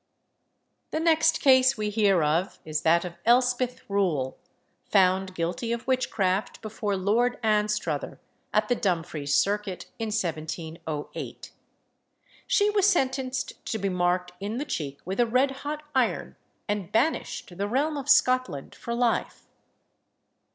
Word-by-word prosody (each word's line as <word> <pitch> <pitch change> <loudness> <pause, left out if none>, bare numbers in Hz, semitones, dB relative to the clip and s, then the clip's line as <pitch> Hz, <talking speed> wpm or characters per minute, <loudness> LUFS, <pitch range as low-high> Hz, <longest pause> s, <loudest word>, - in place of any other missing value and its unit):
The 315 - -2
next 320 0 +3
case 260 -2 +5
we 210 -1 -2
hear 200 -5 +3
of 165 +6 0
is 155 -1 -2
that 170 +2 +3
of 175 -1 -8
Elspeth 250 +1 +2
Rule, 170 -10 0 0.5
found 190 -1 +2
guilty 175 +7 -2
of 235 0 -3
witchcraft 215 -5 0
before 210 -2 -2
Lord 230 +6 +1
Anstruther, 210 -8 0 0.3
at 215 0 +2
the 245 - +3
Dumfries 165 -8 -1
circuit, 200 +2 0
in 225 - -2
1708. 160 -5 -4 1.0
She 420 -4 +3
was 405 -2 +3
sentenced 265 -6 -1
to 220 - -1
be 200 -2 -1
marked 180 0 0
in 205 +4 -4
the 285 - -2
cheek 145 - -4
with 190 +5 -4
a 240 - +4
red 255 +4 +2
hot 295 +3 -5
iron, 260 -3 0 0.3
and 205 -4 -2
banished 225 - -1
the 200 - 0
realm 285 +7 0
of 280 0 -5
Scotland 255 - +3
for 235 - -5
life. 240 -1 0
210 Hz, 135 wpm, -26 LUFS, 180-255 Hz, 1.0 s, case